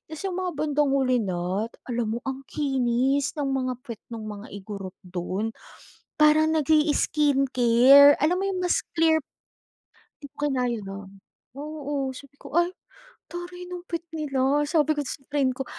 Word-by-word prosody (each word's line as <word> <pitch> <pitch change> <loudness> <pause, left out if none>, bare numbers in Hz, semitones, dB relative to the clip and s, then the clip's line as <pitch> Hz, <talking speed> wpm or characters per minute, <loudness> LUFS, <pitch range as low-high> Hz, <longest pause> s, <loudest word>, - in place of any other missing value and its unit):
Tapos 315 +4 -8
'yung 370 -1 -2
mga 365 -1 -1
bandang 295 -1 +1
huli 260 -3 +2
na. 185 +2 -2 0.2
Alam 235 -2 -2
mo - - -2
ang 265 0 -4
kinis 270 -1 0
ng 295 - -1
mga 255 -1 -1
puwet 230 -3 -8
nung 230 -2 -7
mga 210 0 -8
Igorot 195 -1 -8
dun, 185 +4 -3 0.6
parang 305 +1 +5
nag-i-skincare. 285 -3 +5
Alam 315 +5 +2
mo - - -1
'yung 370 -1 -2
mas 355 - +2 0.2
clear 320 -1 +4 1.0
di - - -6
ko 295 +1 -1
kinaya, 250 -4 -1
nun. 195 0 -9 0.4
Oo, 290 -2 -4
sabi 280 +2 -13
ko, - - -12
"Ay, 345 +1 +3 0.6
taray 350 +1 -7
ng 360 0 -7
puwet 335 -1 -3
nila." 285 -2 +1
sabi 310 -1 +2
ko - - +2
sa - - -5 0.2
friend 265 -3 +2
ko, 270 - -2
275 Hz, 155 wpm, -25 LUFS, 235-305 Hz, 1.0 s, parang